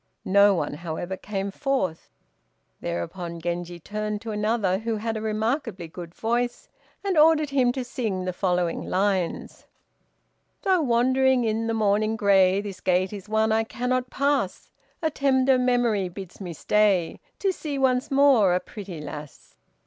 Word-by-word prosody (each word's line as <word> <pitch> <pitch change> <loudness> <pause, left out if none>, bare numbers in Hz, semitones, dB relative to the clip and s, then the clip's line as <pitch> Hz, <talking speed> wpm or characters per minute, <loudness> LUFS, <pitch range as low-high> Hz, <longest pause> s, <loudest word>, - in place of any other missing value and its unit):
No 200 +1 +5
one, 150 -5 -2
however, 170 +4 -5
came 195 +1 -4
forth. 195 - -2 0.7
Thereupon 170 - -4
Genji 175 +1 -4
turned 210 +3 -4
to 230 -1 -5
another, 210 -3 0
who 225 +1 -2
had 225 +1 -3
a 220 - -3
remarkably 220 - -2
good 170 +1 -10
voice, 240 +2 -1 0.4
and 385 -5 +1
ordered 310 -2 +5
him 255 -3 +3
to 260 -1 -3
sing 215 -7 -3
the 185 - -2
following 180 -2 0
lines: 190 -2 -1 1.0
"Though 370 -3 +3
wandering 260 0 +3
in 225 0 0
the 225 - 0
morning 215 0 +2
gray, 195 -2 +4
This 200 -2 -8
gate 185 +2 +1
is 205 0 -8
one 220 0 +2
I 220 +1 +3
cannot 250 +2 -2
pass, 275 -9 -1 0.3
A 315 - +1
tender 265 -2 +3
memory 240 -6 +1
bids 190 +1 -10
me 175 -3 -5
stay 195 -1 +1 0.2
To 390 - +1
see 295 -5 -4
once 260 0 +1
more 270 -10 +5
a - - +2
pretty 190 -5 -9
lass." 150 -1 -9
215 Hz, 150 wpm, -25 LUFS, 185-250 Hz, 1.0 s, No